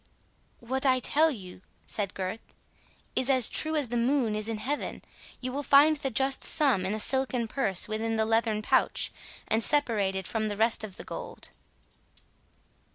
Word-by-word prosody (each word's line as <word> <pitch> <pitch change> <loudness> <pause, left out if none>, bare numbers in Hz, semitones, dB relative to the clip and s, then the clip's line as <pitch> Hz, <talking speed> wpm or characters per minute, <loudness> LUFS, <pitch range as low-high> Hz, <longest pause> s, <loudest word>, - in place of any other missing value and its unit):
"What 260 +3 -3
I 260 -2 +3
tell 310 +5 +2
you," 185 -10 -9 0.2
said 200 -3 -3
Gurth, 190 +4 -6 0.6
"is 255 - +2
as 255 -4 +5
true 315 0 +2
as 290 -6 -1
the 240 - -2
moon 240 -2 +1
is 215 +1 0
in 225 - -3
heaven. 280 +7 -4 0.4
You 255 0 -3
will 280 +3 -3
find 290 +2 +5
the 275 -2 -3
just 265 +2 +1
sum 250 -12 +3
in 205 - -2
a - - -4
silken 255 -1 +1
purse 215 -7 0
within 220 +1 -2
the 220 0 +1
leathern 225 -1 0
pouch, - - +1 0.4
and 220 - +1
separate 210 -9 +1
from 215 +3 -2
the 205 -1 -4
rest 225 +1 +2
of 200 -4 -8
the - - -8
gold." - - -8
230 Hz, 170 wpm, -28 LUFS, 215-270 Hz, 0.6 s, as